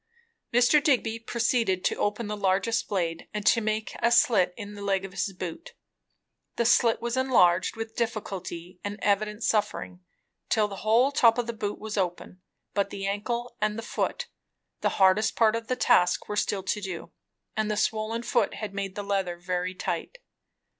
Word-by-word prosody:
Mr. 245 +5 +4
Digby 235 -6 +2
proceeded 230 -5 0
to - - +2
open 210 +3 -1
the 210 0 -3
largest 200 +3 +1
blade 170 -5 -2
and 210 -1 -3
to 230 - +5
make 215 0 -2
a 235 - +3
slit 205 -6 +4
in 205 -2 -7
the 205 - -9
leg 195 -1 0
of 195 - -8
his 195 - -2
boot. 180 - -7 0.8
The 235 - 0
slit 230 0 +3
was 235 0 -1
enlarged, 185 -10 +3
with 225 0 -6
difficulty 190 -6 -4
and 205 0 -4
evident 210 +2 0
suffering, 210 -4 -1 0.5
till 215 -2 +3
the 200 -1 -8
whole 230 +7 +3
top 230 -5 +5
of 245 - 0
the 235 - -4
boot 210 -2 -3
was 215 0 -6
open; 180 0 -3 0.3
but 200 -1 0
the 195 -1 -5
ankle 235 +5 -3
and 210 0 0
foot, - - -2 0.5
the - - +1
hardest 195 +3 +4
part 225 -1 +4
of 230 0 -4
the 255 - 0
task, 180 -6 +3
were 210 - -3
still 200 -1 0
to 210 +2 -1
do, 190 -4 -6 0.4
and 215 0 0
the 210 - -1
swollen 220 +2 -1
foot - - +1
had 210 -2 -5
made 195 -1 -4
the 205 - -4
leather 195 -3 -1
very 180 +1 -3
tight. - - -4
210 Hz, 180 wpm, -27 LUFS, 190-230 Hz, 0.8 s, to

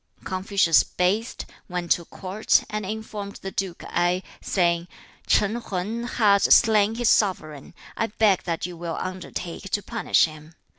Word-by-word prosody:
2. - - -22
Confucius 185 -3 +3
bathed, 200 +6 -1 0.2
went 175 -1 -4
to 170 - +2
court, 195 +5 0
and 210 -2 -3
informed 210 -1 -6
the 195 - -4
duke 190 -3 -4
Ai, 175 +2 0 0.2
saying, 170 -2 +1 0.4
'Chan 215 +4 +2
Hang 215 +6 -3
has 205 -5 +3
slain 220 -1 +5
his 240 0 0
sovereign. 155 - 0 0.2
I 225 - 0
beg 210 -3 +2
that 165 -2 -2
you 180 -1 -6
will 170 -1 -5
undertake 185 0 -6
to 205 +1 -1
punish - - +2
him.' 155 0 -11
190 Hz, 150 wpm, -24 LUFS, 175-210 Hz, 0.4 s, slain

